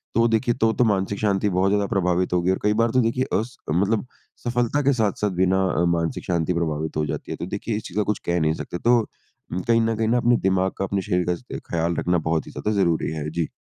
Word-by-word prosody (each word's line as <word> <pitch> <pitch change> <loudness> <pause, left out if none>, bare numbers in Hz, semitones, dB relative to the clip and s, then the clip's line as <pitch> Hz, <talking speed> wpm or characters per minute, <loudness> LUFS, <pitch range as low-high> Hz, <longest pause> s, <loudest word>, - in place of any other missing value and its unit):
तो - - +3
वो 115 - +4
देखिए 115 +1 +1
तो 115 - +4
तो - - +2
मानसिक 100 -1 0
शांति 100 -1 +1
बहुत 95 +1 +2
ज़्यादा 100 0 +2
प्रभावित 90 -1 0
होगी। 90 +1 +2
और 95 - -1
कई 105 0 +3
बार 115 - +2
तो 130 - +3
देखिए 120 +3 +1 0.2
अस 115 +4 -5
मतलब 100 +9 +1 0.4
सफलता 120 +4 0
के 140 0 +4
साथ-साथ 105 -3 0
भी 95 - +5
ना 95 +1 +2 0.4
मानसिक 85 -1 -2
शांति 85 0 0
प्रभावित 80 -2 -2
हो 75 - +1
जाती 75 0 -5
है। - - -2
तो - - -4
देखिए 100 +4 -3
इस 110 - -6
चीज़ 95 - -8
का 105 - +3
कुछ 105 0 -1
कह 85 0 +1
नहीं 80 -1 +2
सकते। 85 - -5
तो 120 +1 +4 0.5
उम 90 - -2
कहीं 115 0 +4
न 115 0 +1
कहीं 110 0 0
न 115 - +2
अपने 120 0 +3
दिमाग 95 0 +1
का, 95 - -1
अपने 100 0 -1
शरीर 90 -1 0
का 90 +1 0
स - - -15 0.3
ख्याल 85 0 0
रखना 90 +1 +1
बहुत 80 -1 -1
ही - - -9
ज़्यादा 105 - -2
ज़रूरी 85 -5 +1
है। 75 -1 -4
जी। 85 -1 -1
95 Hz, 260 wpm, -23 LUFS, 85-110 Hz, 0.5 s, भी